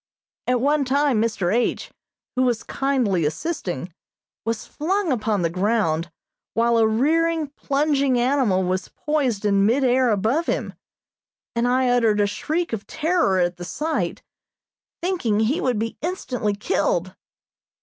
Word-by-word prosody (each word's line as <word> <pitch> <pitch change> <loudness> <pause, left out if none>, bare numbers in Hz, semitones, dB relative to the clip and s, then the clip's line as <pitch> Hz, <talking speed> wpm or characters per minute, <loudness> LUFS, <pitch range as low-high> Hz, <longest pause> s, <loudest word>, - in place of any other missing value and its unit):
At 250 0 +2
one 290 +2 +2
time 275 -3 +2
Mr. 210 -5 0
H., 240 +1 0 0.4
who 255 - +1
was 245 -3 +1
kindly 250 -11 0
assisting, 175 - -3 0.5
was 225 -1 -2
flung 365 +2 -1
upon 215 -6 0
the 165 - +2
ground, 180 -4 0 0.5
while 235 0 +3
a 220 - +5
rearing, 315 +7 +1
plunging 280 -2 +1
animal 240 -7 +2
was 185 0 -1
poised 265 -9 -1
in 200 -1 +3
mid 260 +5 +2
air 255 0 +3
above 225 - +1
him; - - -2 0.8
and 235 +1 +1
I 255 +1 +2
uttered 230 -4 +3
a 205 - +4
shriek 315 +10 -2
of 210 -3 -4
terror 320 - +1
at 175 0 +1
the 175 - -7
sight, 310 - -2 0.8
thinking 250 - 0
he 250 +10 +1
would 250 -4 +1
be 225 +1 -3
instantly 255 - -2
killed. 390 - 0
245 Hz, 140 wpm, -23 LUFS, 205-285 Hz, 0.8 s, a